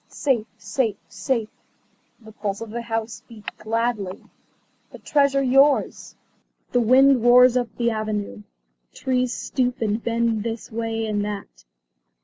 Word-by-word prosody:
"Safe, 240 Hz, -6 st, -1 dB
safe, 235 Hz, -8 st, -1 dB
safe," 215 Hz, +3 st, -2 dB, 0.7 s
the 220 Hz, -2 st, -14 dB
pulse 205 Hz, -2 st, -4 dB
of 230 Hz, -2 st, -7 dB
the 235 Hz, +1 st, -4 dB
house 225 Hz, -1 st, -4 dB
beat 220 Hz, -3 st, -14 dB
gladly. 225 Hz, -3 st, -2 dB, 0.7 s
"The -, -, -11 dB
Treasure 280 Hz, -2 st, +2 dB
yours." 270 Hz, +2 st, +2 dB, 0.6 s
The 245 Hz, -, +2 dB
wind 260 Hz, +2 st, +5 dB
roars 250 Hz, +1 st, +7 dB
up 245 Hz, -2 st, 0 dB
the 235 Hz, -1 st, +1 dB
avenue. 215 Hz, -1 st, -3 dB, 0.5 s
Trees 255 Hz, -2 st, 0 dB
stoop 250 Hz, -1 st, -2 dB
and 220 Hz, 0 st, -1 dB
bend 230 Hz, -1 st, 0 dB
this 230 Hz, +1 st, -5 dB
way 225 Hz, 0 st, -2 dB
and 210 Hz, -1 st, -1 dB
that. 205 Hz, -1 st, -7 dB
230 Hz, 130 wpm, -23 LUFS, 215-250 Hz, 0.7 s, roars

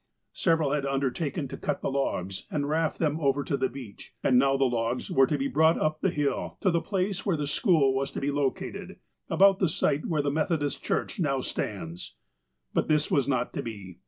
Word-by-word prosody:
Several 165 Hz, -5 st, +2 dB
had 145 Hz, -1 st, 0 dB
undertaken 140 Hz, +2 st, -1 dB
to -, -, -6 dB
cut -, -, -2 dB
the -, -, 0 dB
logs 95 Hz, -9 st, -2 dB
and 145 Hz, -2 st, -1 dB
raft 160 Hz, +1 st, 0 dB
them 155 Hz, -1 st, 0 dB
over 140 Hz, -1 st, +1 dB
to 140 Hz, -, -1 dB
the 135 Hz, -1 st, 0 dB
beach, 110 Hz, -5 st, -11 dB
and 125 Hz, -1 st, +5 dB
now 135 Hz, +1 st, +3 dB
the 135 Hz, -, +3 dB
logs 120 Hz, 0 st, -1 dB
were 135 Hz, 0 st, +5 dB
to 150 Hz, -, 0 dB
be 135 Hz, 0 st, -1 dB
brought 160 Hz, +5 st, +3 dB
up 155 Hz, 0 st, 0 dB
the 190 Hz, -, +2 dB
hill, 145 Hz, -4 st, -2 dB
to 190 Hz, -, +3 dB
the 170 Hz, -1 st, +1 dB
place 195 Hz, -1 st, -1 dB
where 185 Hz, -5 st, +1 dB
the 150 Hz, -, -2 dB
school 150 Hz, -, +3 dB
was 135 Hz, +1 st, -1 dB
to -, -, -5 dB
be 140 Hz, +1 st, -1 dB
lo 140 Hz, -1 st, +2 dB
cated, 190 Hz, +3 st, -8 dB, 0.3 s
about 195 Hz, +3 st, +5 dB
the 185 Hz, -, +2 dB
site 150 Hz, -3 st, 0 dB
where 155 Hz, -3 st, 0 dB
the 140 Hz, -, 0 dB
Methodist 150 Hz, -2 st, -1 dB
Church -, -, -2 dB
now 140 Hz, -6 st, +1 dB
stands. 90 Hz, -8 st, -5 dB, 0.6 s
But -, -, +1 dB
this 150 Hz, -1 st, +2 dB
was 140 Hz, -2 st, +2 dB
not 130 Hz, -3 st, 0 dB
to -, -, -2 dB
be. 100 Hz, -6 st, -8 dB
145 Hz, 215 wpm, -27 LUFS, 135-160 Hz, 0.6 s, and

